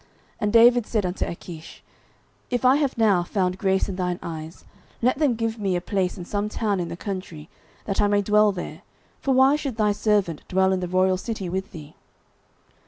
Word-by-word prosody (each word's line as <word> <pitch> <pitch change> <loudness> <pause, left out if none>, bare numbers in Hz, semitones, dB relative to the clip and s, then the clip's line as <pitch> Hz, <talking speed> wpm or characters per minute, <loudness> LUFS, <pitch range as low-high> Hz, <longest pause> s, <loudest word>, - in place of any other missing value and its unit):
09:027:005 - - -33 0.3
And 210 0 0
David 240 0 +6
said 215 -4 0
unto 180 +1 -2
Achish, 170 -1 -9 0.7
If 245 0 -1
I 260 +2 +6
have 285 -5 -1
now 210 -6 +4
found 185 +1 -1
grace 190 -1 +1
in 190 -2 -5
thine 180 -1 -1
eyes, 160 0 -8 0.3
let 255 +3 +1
them 285 -6 +2
give 225 0 -2
me 195 -3 0
a - - +1
place 185 +1 -2
in 175 - -7
some 205 +2 -2
town 210 -3 -1
in 175 - -2
the 170 0 -7
country, 180 -6 -6 0.4
that 195 0 -1
I 205 - +3
may 205 0 +2
dwell 210 +1 +4
there: 180 -3 -7 0.4
for 270 -2 0
why 265 +2 +5
should 280 -5 -4
thy 210 -2 +2
servant 205 -6 0
dwell 190 +1 +2
in 190 - 0
the 180 - -3
royal 185 +1 +2
city 195 -2 -5
with 190 +2 -4
thee? 155 -3 -11
195 Hz, 205 wpm, -24 LUFS, 180-220 Hz, 0.7 s, David